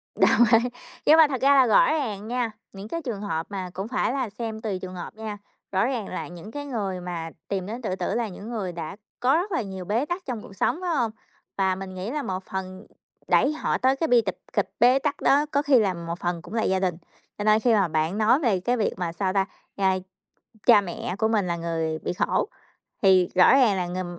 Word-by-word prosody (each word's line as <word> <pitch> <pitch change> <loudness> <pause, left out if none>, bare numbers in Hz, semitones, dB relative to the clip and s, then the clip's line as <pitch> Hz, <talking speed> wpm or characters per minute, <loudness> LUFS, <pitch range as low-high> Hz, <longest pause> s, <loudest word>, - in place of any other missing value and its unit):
Đồng - - +5
ý, 235 +2 +5 0.4
nhưng 310 - +7
mà 320 -2 +8
thật 265 -4 -3
ra 275 +1 +5
là 265 -2 +6
rõ 215 - +5
ràng 220 -10 -2
nha, 240 -1 -1 0.2
những 195 +2 -8
cái 335 +7 -4
trường 235 -9 -4
hợp 165 -5 -2
mà 190 -2 -4
cũng 195 +3 -4
phải 255 0 0
là 260 -4 -1
xem 220 +1 -5
tùy 200 -4 -3
trường 185 0 -7
hợp 175 - -7
nha, 215 -1 -6 0.3
rõ 195 +3 +2
ràng 245 -6 -2
là 160 -4 -5
những 175 +6 -10
cái 290 +2 -6
người 200 -9 -3
mà 170 -2 -5 0.2
tìm 195 -2 -2
đến 225 +5 -6
tự 200 -6 -2
tử - - -2
là 235 -1 0
những 205 +3 -9
người 205 -6 -3
đã 165 0 -6 0.2
có 255 +4 +3
rất 370 +5 0
là 335 - 0
nhiều 190 -3 -6
bế 225 +8 0
tắc 350 +4 -4
trong 245 -5 -4
cuộc 200 - -12
sống 195 - +1
phải 365 - -2
hông? 235 -5 +1 0.5
Và 190 -1 +2
mình 190 0 -7
nghĩ 185 +6 -4
là 295 -1 -2
một 185 0 -4
phần 190 +1 -6 0.4
đẩy 290 - +3
họ 310 - -1
tới 260 +2 +3
cái 320 +4 -1
bi 245 -4 +5
tịch 190 -4 -4 0.2
kịch 205 - +1
bế 250 +3 +6
tắc 290 +1 -2
đó 285 +2 +4
có 285 - +2
khi 285 -4 +5
là 200 -4 +1
một 170 0 -6
phần 175 -1 -2
cũng 180 - -11
là 225 -1 0
gia 190 0 +1
đình, 185 -3 0 0.4
cho 205 - -3
nên 215 +1 +5
khi 235 0 +3
mà 195 -4 +3
bạn 160 +4 -1
nói 220 +5 +4
về 225 - +1
cái 245 +7 0
việc 215 - 0
mà, 175 -2 -2
sao 185 +2 -1
ta, 195 -1 +2 0.3
a, 190 -1 +2 0.7
cha 225 -4 +8
mẹ 180 -1 -5
của 220 - +2
mình 210 -4 +1
là 170 - 0
người 165 -2 -2
bị - - -3
khổ, 420 - 0 0.5
thì 185 -3 +5
rõ 180 - +7
ràng 245 -7 +4
là 180 -1 -1
người 175 -1 -5
205 Hz, 250 wpm, -25 LUFS, 185-245 Hz, 0.7 s, mà